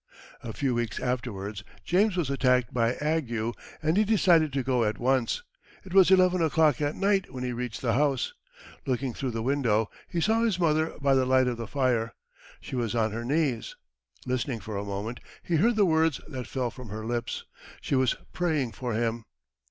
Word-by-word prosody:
A 115 - -6
few 130 +3 -1
weeks 120 -1 -2
afterwards, 110 -6 -3 0.2
James 190 +2 +2
was 155 -6 0
attacked 125 -3 +2
by 120 0 +1
ague, 120 -7 -1 0.3
and 160 +4 +2
he 215 - +5
decided 180 -8 +4
to 135 -1 -1
go 125 -2 +1
at 105 0 0
once. 130 - +1 0.4
It 185 - -10
was 190 -2 +7
eleven 185 -1 +5
o'clock 155 -3 +3
at 145 0 0
night 195 -1 +1
when 125 -2 -5
he 125 -1 -2
reached 125 +1 -5
the 115 -3 +2
house. 140 - +1 0.5
Looking 130 -1 -1
through 130 - -3
the 115 -1 -3
window, 115 -5 +1 0.2
he 170 - -2
saw 220 +6 +2
his 220 -6 +1
mother 160 -1 +1
by 140 -1 +3
the 130 -1 +3
light 130 0 +4
of 120 -2 -1
the 115 - -5
fire. 125 -5 0 0.4
She - - -7
was 120 -2 -1
on 110 -2 +1
her 115 +2 -4
knees. 135 -3 -1 0.5
Listening 125 -1 -2
for 105 +1 -7
a 100 - -2
moment, 100 +4 -4 0.2
he 170 - +1
heard 230 +8 +3
the 210 -2 +4
words 160 -3 +2
that 130 -5 -6
fell 125 -3 -2
from 125 -2 -10
her 110 +2 -6
lips. 120 0 -3 0.3
She - - -4
was 130 -2 +3 0.2
praying 155 -9 0
for 120 +3 -4
him. 115 0 -1
130 Hz, 195 wpm, -27 LUFS, 115-160 Hz, 0.5 s, was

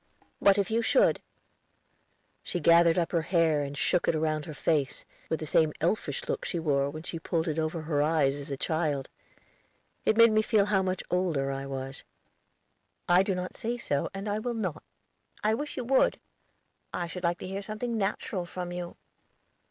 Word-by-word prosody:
"What 200 0 +5
if 200 +1 0
you 230 +1 +2
should?" - - +3 1.2
She 175 - -3
gathered 170 +1 +5
up 170 -2 +1
her 170 - +2
hair 165 -3 +2
and 140 0 -5
shook 180 +4 +1
it 160 - +2
round 155 -1 -1
her 155 - -6
face, 145 -1 0 0.2
with 160 - 0
the 155 - -4
same 155 0 +3
elfish 165 -4 -1
look - - -2
she - - -3
wore 140 -4 +1
when 155 +2 -7
she 170 -1 -5
pulled 165 0 -1
it 155 0 -1
over 155 +1 -2
her 150 -2 0
eyes 150 -3 +3
as 145 +1 -7
a 140 - -3
child. 155 -3 -1 0.9
It 220 - +2
made 230 -1 +8
me 215 0 +4
feel 215 -2 +3
how 200 -2 +2
much 185 -1 -2
older 165 -7 +1
I 135 0 -4
was. 135 0 -6 1.0
"I 175 +1 +6
do 195 -1 0
not 180 0 -4
say 235 +2 -2
so, 145 -11 -1
and 195 +2 -6
I 205 +1 0
will 240 +2 -3
not." 185 -9 -3 0.6
"I 215 +1 +3
wish 290 +6 -4
you - - -2
would; 260 +2 +3 0.7
I 175 - -2
should 180 +2 -7
like 170 0 +1
to - - -7
hear 195 +1 -4
something 215 +4 -3
natural 195 -3 -2
from 180 0 -5
you." 175 -1 -6
170 Hz, 190 wpm, -29 LUFS, 155-195 Hz, 1.2 s, made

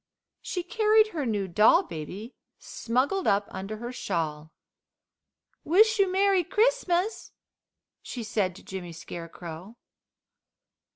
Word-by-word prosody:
She 360 - -4
carried 435 +2 +3
her 305 - -3
new 205 -4 -1
doll 215 - +5
baby 190 - -7 0.2
smuggled 270 +11 -1
up 200 0 +3
under 195 +3 -5
her 240 +2 -6
shawl. 160 -9 -3 1.1
"Wish 430 +7 +4
you 390 -2 +3
Merry 385 -1 +3
Christmas!" 420 -1 0 0.7
she 245 - -6
said 205 -4 -1
to - - -13
Jimmy 180 -3 -7
Scarecrow. 170 +4 -9
235 Hz, 110 wpm, -27 LUFS, -, 1.1 s, doll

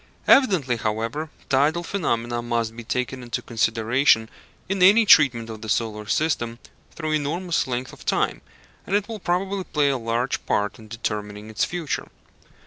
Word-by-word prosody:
Evidently, 180 - +4
however, 115 +8 -2 0.2
tidal 150 +5 +2
phenomena 120 -11 -1
must 115 -1 -2
be 120 - -8
taken 125 +2 -3
into 120 -1 -3
consideration 115 +1 +2 0.4
in 195 0 -2
any 205 +5 +7
treatment 130 - +5
of 110 -1 -8
the 110 - -7
solar 105 -1 -1
system 120 -5 0 0.3
through 155 -1 -4
enormous 160 +4 0
length 125 0 -3
of - - -13
time, - - 0 0.5
and 195 - 0
it 205 -1 +1
will 225 -2 -6
probably 190 +2 -1
play 150 -5 +1
a 135 -2 0
large 115 +2 -1
part 105 +1 0
in 110 - -13
determining 105 -1 -5
its 110 - +1
future. 175 -4 -3
125 Hz, 155 wpm, -23 LUFS, 115-160 Hz, 0.5 s, any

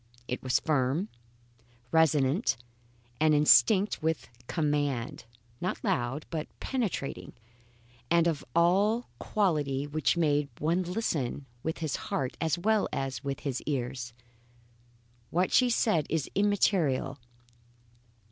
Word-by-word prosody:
It 125 - -3
was 130 -1 +2
firm, 150 +5 0 0.8
resonant, 155 - +3 0.6
and 155 -1 +4
instinct 150 - +5
with 160 0 -1 0.2
command. 145 -8 -1 0.4
Not 185 - -3
loud, 130 +4 -1
but 160 -2 -3
penetrating, 225 - -3 0.8
and 170 -1 +4
of 165 -4 0
a 200 +7 +3 0.2
quality 150 -9 0
which 155 +3 0
made 145 -3 +2
one 165 +4 +1
listen 170 - -2 0.2
with 160 +4 -3
his 155 -5 -2
heart 130 -2 -1
as 160 +1 +1
well 215 +3 +2
as 135 0 -3
with 140 -1 -3
his 135 -5 -3
ears. 125 -3 -3 1.2
What 180 +2 +1
she 250 -1 +5
said 195 -10 +2
is 160 -3 -1
immaterial. 185 -9 +1
155 Hz, 110 wpm, -29 LUFS, 135-180 Hz, 1.2 s, instinct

